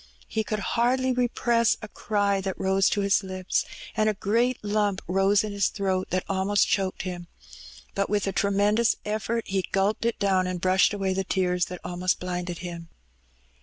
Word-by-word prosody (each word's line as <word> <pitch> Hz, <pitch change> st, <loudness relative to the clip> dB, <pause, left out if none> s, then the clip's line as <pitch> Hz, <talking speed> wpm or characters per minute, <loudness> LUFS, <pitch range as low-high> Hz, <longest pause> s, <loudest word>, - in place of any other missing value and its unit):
He 220 Hz, -, -1 dB
could 215 Hz, 0 st, -2 dB, 0.2 s
hardly 255 Hz, +2 st, +2 dB
repress 240 Hz, -1 st, +2 dB
a -, -, -5 dB
cry 205 Hz, -2 st, 0 dB
that 190 Hz, -1 st, -4 dB
rose 190 Hz, 0 st, +3 dB
to 205 Hz, -, 0 dB
his 200 Hz, 0 st, +3 dB
lips, 185 Hz, -1 st, -2 dB, 0.3 s
and 215 Hz, -1 st, +2 dB
a 215 Hz, -, -1 dB
greskt 230 Hz, +6 st, +1 dB
lump 205 Hz, -2 st, 0 dB
rose 195 Hz, +3 st, +3 dB
in 215 Hz, -, -4 dB
his 200 Hz, -1 st, +1 dB
throat 190 Hz, -2 st, -1 dB
that 185 Hz, 0 st, 0 dB
almost 195 Hz, +1 st, +2 dB
choked 190 Hz, -2 st, -1 dB
him; 175 Hz, -2 st, -6 dB, 0.7 s
but 200 Hz, 0 st, -1 dB
with 205 Hz, -1 st, +1 dB
a 195 Hz, -, 0 dB
tremendous 205 Hz, +4 st, +2 dB
eflFort 215 Hz, +2 st, -1 dB
he 190 Hz, -1 st, -1 dB
gulped 200 Hz, +3 st, +1 dB
it 235 Hz, -, 0 dB
down, 190 Hz, -2 st, +2 dB
and 180 Hz, -1 st, -3 dB
brushed 185 Hz, +3 st, +3 dB
away 195 Hz, -2 st, -1 dB
the 190 Hz, +1 st, -1 dB
tears 180 Hz, -1 st, 0 dB
that 180 Hz, -1 st, -8 dB
almost 180 Hz, +1 st, -1 dB
blinded 180 Hz, -1 st, -4 dB
him. 170 Hz, -1 st, -7 dB
195 Hz, 180 wpm, -26 LUFS, 185-215 Hz, 0.7 s, rose